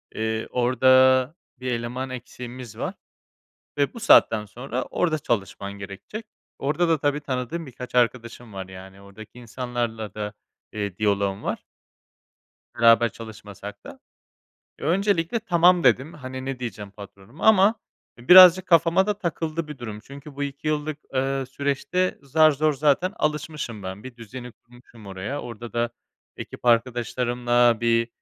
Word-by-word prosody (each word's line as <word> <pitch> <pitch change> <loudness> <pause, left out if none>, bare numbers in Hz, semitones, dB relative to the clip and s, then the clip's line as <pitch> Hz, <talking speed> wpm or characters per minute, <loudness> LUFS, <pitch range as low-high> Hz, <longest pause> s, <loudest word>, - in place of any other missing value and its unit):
Eee, 110 0 -2
orda 130 +2 +4 0.2
1 125 0 -3
eleman 125 +2 -3
eksiğimiz 125 -2 -9
var - - -3 0.9
ve 140 -1 +1
bu 235 - -8
saatten 110 - +5
sonra 125 +4 -5
orda 160 -3 -1
çalışman 100 - -3
gerekecek." 100 - -9 0.3
Orda 155 +5 0
da, 165 -1 +3
tabii 145 +1 0
tanıdığım 140 +4 -4
birkaç 125 -1 -10
arkadaşım 120 -1 0
var, 95 -1 -7
yani, 95 +1 -12
ordaki 100 +4 -13
insanlarla 120 -2 -4
da, 105 -1 -5 0.4
eee, 100 -3 -4
diyaloğum 100 -1 0
var. - - -4 1.1
Beraber 115 0 +6
çalışmasak 105 -2 -10
da. - - -11 0.8
Öncelikle 185 +4 +1
"Tamam." 175 -4 +4
dedim. 130 +5 +3
Hani, 130 -2 -7
ne 135 -1 -4
diyeceğim 105 -4 -6
patronuma. 100 +6 -10
Ama 215 0 +6 0.4
birazcık 180 +7 +8
kafama 170 +2 +4
da 210 -1 0
takıldı 165 -3 -3
bir 150 -2 -8
durum. 110 -4 -7
Çünkü 140 +5 -12
bu 145 - -3
2 140 +2 -6
yıllık, 155 0 -1 0.2
eee, 135 0 0
süreçte 140 +7 -1
zar 155 +3 +4
zor 150 +2 +1
zaten 150 +7 +1
alışmışım 150 - -3
ben, 95 +2 -7
bir 130 -1 -10
düzeni 120 +2 -9
kurmuşum 120 -2 -18
oraya, 100 +9 -5
orda 120 -1 -9
da 120 0 0 0.5
ekip - - -9
arkadaşlarımla 120 0 +2
bir 115 0 +2
125 Hz, 135 wpm, -24 LUFS, 115-150 Hz, 1.1 s, birazcık